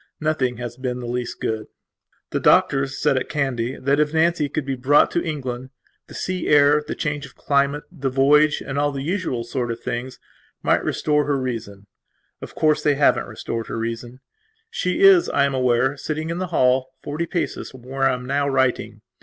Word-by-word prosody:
Nothing 145 -6 0
has 120 0 -6
been 125 -1 -3
the 125 - -6
least 120 0 -4
good. 110 -1 -3 0.6
The - - 0
doctors 135 -1 +3
said, 145 -3 +2
at 130 - -2
Kandy, 135 -4 -1
that 140 +2 0
if 150 +1 +1
Nancy 160 -2 +2
could 150 -1 -3
be 135 - -2
brought 130 +3 +3
to 170 - 0
England, 130 -5 -4 0.4
the - - -12
sea 185 -1 -3
air, 145 0 +5
the - - -3
change 145 -2 -3
of 135 - -20
climate, 140 +1 +1
the 140 -6 -3
voyage, 145 +3 +3
and 140 0 -3
all 145 0 +1
the 135 -1 -5
usual 165 -8 -2
sort 120 +1 -3
of 115 0 -4
things, 125 +2 -5 0.5
might - - +2
restore 150 -1 +1
her 145 0 0
reason. 115 -6 -5 0.6
Of - - -9
course, 155 -1 +2
they 145 -1 +2
haven't 140 0 +2
restored 115 -1 -5
her - - -4
reason. 115 +3 -5 0.5
She 475 -3 -1
is, 390 -3 +7
I 140 - +2
am 140 - -1
aware, 130 +1 +2
sitting 155 +2 -3
in 170 - -3
the 185 - -2
hall, 130 -5 +2
forty 155 +4 -3
paces 175 -1 -3
from 130 -2 -14
where 135 +1 0
I - - +1
am 125 0 -8
now 140 +2 0
writing. 130 -2 0
135 Hz, 195 wpm, -22 LUFS, 125-150 Hz, 0.6 s, is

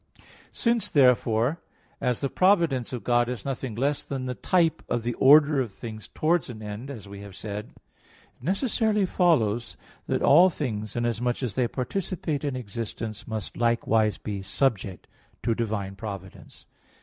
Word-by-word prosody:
Since, 230 -3 +1
therefore, 125 +1 +3 0.4
as 125 -2 0
the 140 - 0
providence 170 - +3
of 125 -3 -5
God 120 0 +2
is 125 -5 -5
nothing 130 -4 -3
less 140 +5 0
than 135 -2 -4
the 125 - -2
type 165 +4 +1
of 120 - 0
the 120 +1 -1
order 145 +2 +6
of 120 -5 -3
things 110 +1 -8
towards 160 -2 0
an 110 -3 -8
end, 105 +6 -6
as 110 -8 -8
we 100 0 -9
have 100 -2 -10
said; 105 +1 -6
it - - -28
necessarily 210 - +1
follows 120 - +1 0.3
that - - 0
all 175 +6 +7
things, 110 - -4
inasmuch 120 +2 -1
as 120 - -2
they 125 -2 +1
participate 155 +3 -3
in 140 -3 -1
existence, 115 -2 -5
must 110 -3 -5
likewise 115 -2 +2
be 100 -2 -5
subject 95 -2 -1 0.4
to 115 - +2
divine 105 -4 -3
providence. 95 -2 -9
120 Hz, 155 wpm, -26 LUFS, 110-145 Hz, 0.4 s, all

